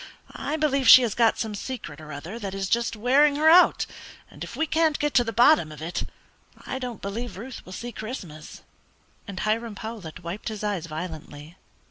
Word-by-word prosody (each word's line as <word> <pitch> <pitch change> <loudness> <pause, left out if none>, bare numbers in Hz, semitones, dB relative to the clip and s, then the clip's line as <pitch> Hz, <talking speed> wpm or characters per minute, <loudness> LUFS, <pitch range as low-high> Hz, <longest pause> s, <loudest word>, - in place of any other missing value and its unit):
I 300 +2 -3
believe 275 -5 +2
she 255 - +11
has 225 -4 0
got 230 -1 +3
some 220 -2 -3
secret 200 - -6
or 155 -1 -10
other 165 +10 -7
that 195 -3 -5
is 195 0 -2
just 235 +2 0
wearing 275 +6 +4
her 305 +2 +2
out, 350 +3 +6 0.5
and - - -9
if - - -8
we 320 - 0
can't 315 -1 +2
get 295 -1 -1
to 245 - +5
the 225 - -3
bottom 235 - +4
of 150 - -10
it 165 +3 -4 0.6
I 260 - -4
don't 245 -4 -6
believe 220 +3 -5
Ruth 250 +5 -8
will - - -10
see 240 +5 -6
Christmas," 190 - -8 0.6
and 195 -2 -6
Hiram 220 0 -1
Powlett 205 -7 -8
wiped 170 +5 -6
his 215 -1 -6
eyes 200 -6 -2
violently. 155 -1 -8
220 Hz, 195 wpm, -25 LUFS, 180-255 Hz, 0.6 s, she